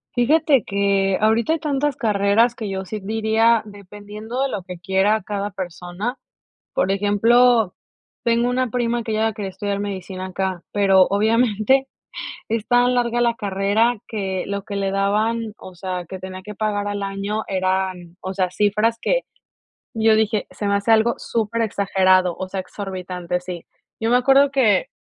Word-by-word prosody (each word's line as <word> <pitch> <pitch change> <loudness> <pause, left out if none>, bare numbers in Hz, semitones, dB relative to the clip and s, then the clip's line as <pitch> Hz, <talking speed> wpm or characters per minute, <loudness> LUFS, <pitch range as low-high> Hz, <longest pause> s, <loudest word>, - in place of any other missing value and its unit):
Fíjate 275 0 +3
que 195 -1 +1
ahorita 225 +7 +3
hay 325 - -1
tantas 290 -2 -1
carreras 220 0 +2
que 220 - -5
yo 190 -1 -3
sí 210 +3 -5
diría, 220 +2 +2
dependiendo 210 +4 -7
de 275 - +1
lo 200 -7 -4
que 180 -1 -9
quiera 190 +4 +2
cada 205 +1 -3
persona. 180 +6 -5 0.6
Por 190 - +1
ejemplo, 220 +2 +3 0.5
tengo 235 +1 +2
una 250 0 0
prima 240 0 0
que 225 - -4
ella 220 +1 +1
quería 205 -2 -5
estudiar 200 0 -3
medicina 190 -2 -5
acá, 190 -1 -3
pero 195 -2 +5
obviamente, 225 +4 +2 0.6
es 225 -1 -2
tan 245 0 +4
larga 240 -1 +1
la 235 -1 +2
carrera 205 +3 +1
que 190 -4 -3
lo 200 0 -4
que 200 - -6
le 195 -1 -1
daban, 215 +3 0
o 185 - -12
sea, 180 0 -4
que 190 +2 -7
tenía 185 0 -7
que 210 +2 -8
pagar 205 -1 -1
al 205 0 -3
año 200 +2 -3
eran, 185 -2 -2
o 190 - -4
sea, 185 -1 0
cifras 210 +4 +1
que - - +1 0.7
yo 220 -1 +4
dije: 215 -1 0
"Se 210 - -6
me 200 - +1
hace 200 +3 +1
algo 225 +1 +4
superexagerado", 200 -5 +1
o 190 - -5
sea, 195 - -3
exorbitante, 185 -2 -5
sí. 180 -2 -7 0.4
Yo 225 - 0
me 245 - +5
acuerdo 270 +2 +5
que 225 -8 +3
205 Hz, 165 wpm, -21 LUFS, 190-230 Hz, 0.7 s, pero